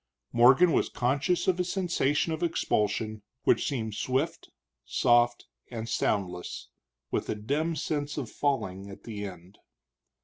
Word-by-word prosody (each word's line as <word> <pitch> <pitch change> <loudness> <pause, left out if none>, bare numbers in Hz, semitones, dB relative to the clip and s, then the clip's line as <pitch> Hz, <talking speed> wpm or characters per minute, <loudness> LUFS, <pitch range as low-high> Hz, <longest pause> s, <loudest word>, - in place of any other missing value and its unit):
Morgan 130 +9 +6
was - - +2
conscious 140 +8 0
of 185 -1 +2
a - - +3
sensation 175 -4 0
of 160 - -4
expulsion, 110 - 0 0.2
which - - +3
seemed 110 -6 -2
swift, 140 +10 -1 0.3
soft, 120 0 +3 0.2
and 115 -2 -5
soundless, 90 -5 -2 0.4
with - - -1
a - - 0
dim 145 +10 -1
sense 145 -1 -2
of 135 -5 -2
falling 100 -9 -1
at 100 - -11
the 105 -3 -5
end. 90 +1 -12
125 Hz, 135 wpm, -29 LUFS, 105-155 Hz, 0.4 s, Morgan